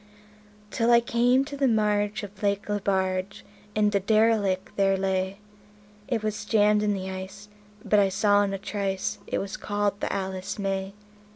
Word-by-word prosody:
Till 230 -1 +1
I 235 0 +7
came 245 +3 +2
to 285 - -7
the 275 -1 +2
marge 210 -1 +1
of 205 0 -10
Lake 200 0 0
Lebarge, 190 -1 -1 0.3
and 210 -1 +2
a 200 - +3
derelict 210 -2 +1
there 195 -1 +2
lay; 190 0 -1 0.7
It 230 -4 -1
was 215 -1 -2
jammed 210 -1 +3
in 210 -1 +1
the 190 0 -5
ice, 190 +2 -8 0.4
but 210 0 +4
I 195 -1 +4
saw 205 +1 +3
in 200 -1 0
a 195 - -2
trice 195 -1 -3
it - - -1
was 195 - -4
called 205 -1 -1
the - - -2
"Alice 190 -1 -4
May". 195 -1 -3
205 Hz, 170 wpm, -26 LUFS, 195-215 Hz, 0.7 s, I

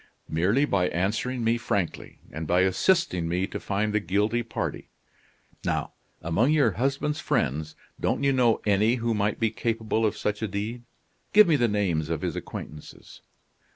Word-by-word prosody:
"Merely 100 - +2
by 95 -9 +1
answering 110 +7 -1
me 115 +1 +2
frankly, 100 -6 -3
and 80 +1 -5
by 90 +2 +3
assisting 95 - +2
me 90 +2 0
to - - -6
find 105 +1 -1
the 105 - +3
guilty 105 +4 0
party. 115 - -4 0.7
Now, - - -2 0.3
among 85 - +2
your 145 -7 +4
husband's 140 - -1
friends, 75 +4 -1 0.2
don't - - 0
you 140 -1 +3
know 120 -3 +3
any 105 +3 +3
who 115 -1 -1
might 105 0 0
be 115 -2 +1
capable 115 -1 -1
of 110 -1 +1
such 105 +1 -2
a 110 - 0
deed? 110 +5 -4 0.5
Give 210 -1 +8
me 165 - +4
the 120 -4 +3
names 90 -8 0
of 80 -2 -2
his - - -2
acquaintances." 75 -1 -9
105 Hz, 165 wpm, -26 LUFS, 95-120 Hz, 0.7 s, Give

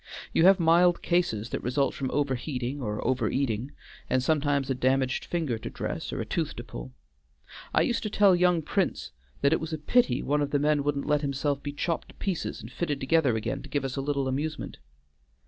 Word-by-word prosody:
You 165 - +4
have 190 0 +7
mild 170 +1 +4
cases 145 -11 0
that - - -2
result 135 +3 0
from 135 -2 -3
over 145 -1 0
heating 130 +1 -3
or 105 -3 -3
over 125 -3 +1
eating, 130 -1 -1 0.4
and 130 0 +2
sometimes 145 -2 +1
a 135 - +1
damaged 130 0 +1
finger 155 -10 -2
to - - -6
dress, - - -4
or - - -4
a - - -2
tooth - - -2
to - - -6
pull. - - -9 0.8
I - - +3
used 240 - 0
to 215 - -3
tell 200 -2 +5
young 175 -2 +3
Prince 190 - -1 0.3
that 140 +2 +4
it - - +2
was 160 0 -5
a - - -1
pity 150 - +2
one 145 +2 +1
of 145 - 0
the 145 - +1
men 145 0 +2
wouldn't 140 -1 -1
let 150 -1 +2
himself 140 0 -1
be 145 - -4
chopped 165 +3 -2
to - - -15
pieces 190 -5 -3
and 110 - -10
fitted 150 -1 -2
together 135 -3 +2
again 120 +5 -2
to - - -11
give 145 -2 -1
us 130 - -3
a 135 - -1
little 140 -1 -1
amusement." 145 +4 -3
140 Hz, 215 wpm, -27 LUFS, 130-160 Hz, 0.8 s, have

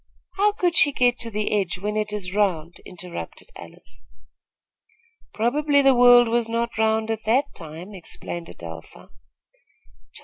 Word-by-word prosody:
"How 415 +2 +3
could 355 -4 0
she 285 - +5
get 245 -1 +2
to 230 - -2
the 210 -1 -2
edge, 195 -4 0
when 210 +3 -4
it 215 0 -1
is 190 -3 -3
round?" 175 -5 -1
interrupted 180 - -9
Alice. - - -14 1.2
"Probably 285 +5 +1
the 270 0 +6
world 245 -1 +7
was 230 0 0
not 235 +1 -2
round 220 0 +1
at 220 -1 -4
that 265 +6 +1
time," 165 +5 -10
explained 175 -2 -8
Adelpha. 80 -1 -11
220 Hz, 140 wpm, -23 LUFS, 185-245 Hz, 1.2 s, world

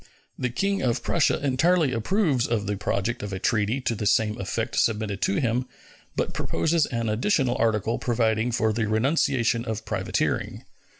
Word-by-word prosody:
The 125 - -2
King 195 +11 -1
of 120 -3 0
Prussia 165 - +2
entirely 155 +3 +3
approves 135 - +1
of 110 -3 -1
the 105 0 -1
project 105 +3 -2
of 105 0 -5
a 95 - -3
treaty 105 +5 0
to 120 - -1
the 105 -1 -2
same 110 +1 +2
effect 95 - -3
submitted 105 -3 0
to 195 - +1
him, 125 -5 0 0.5
but - - -1
proposes 160 -1 +1
an 115 -3 -2
additional 125 - +1
article 110 0 +1
providing 115 -1 +1
for 110 -1 +1
the 110 0 -1
renunciation 120 0 +1
of 110 -3 -4
privateering. - - -2
115 Hz, 165 wpm, -25 LUFS, 110-135 Hz, 0.5 s, entirely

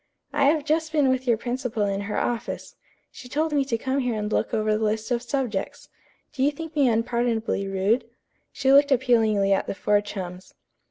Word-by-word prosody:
"I 285 -1 +2
have 295 0 +2
just 315 +1 0
been 295 -4 +3
with 260 0 0
your 235 -2 +3
principal 240 -2 -2
in 200 0 -1
her - - -2
office. 240 -2 -3 0.4
She 250 - -12
told 310 +3 -1
me 285 -2 +3
to 235 -4 -1
come 265 +4 -1
here 250 -3 -1
and 210 0 -3
look - - 0
over 215 0 +1
the 220 - -1
list 215 +3 -1
of 240 -1 +1
subjects. 245 -5 -3 0.4
Do 265 - -4
you 275 - +4
think 320 +2 -8
me 285 -3 +4
unpardonably 230 -3 0
rude?" 195 +5 +1 0.5
She 265 0 +2
looked 280 +1 +6
appealingly 225 -6 +3
at 195 - 0
the - - -3
four 205 +1 +2
chums. 185 -2 -8
240 Hz, 200 wpm, -25 LUFS, 215-275 Hz, 0.5 s, looked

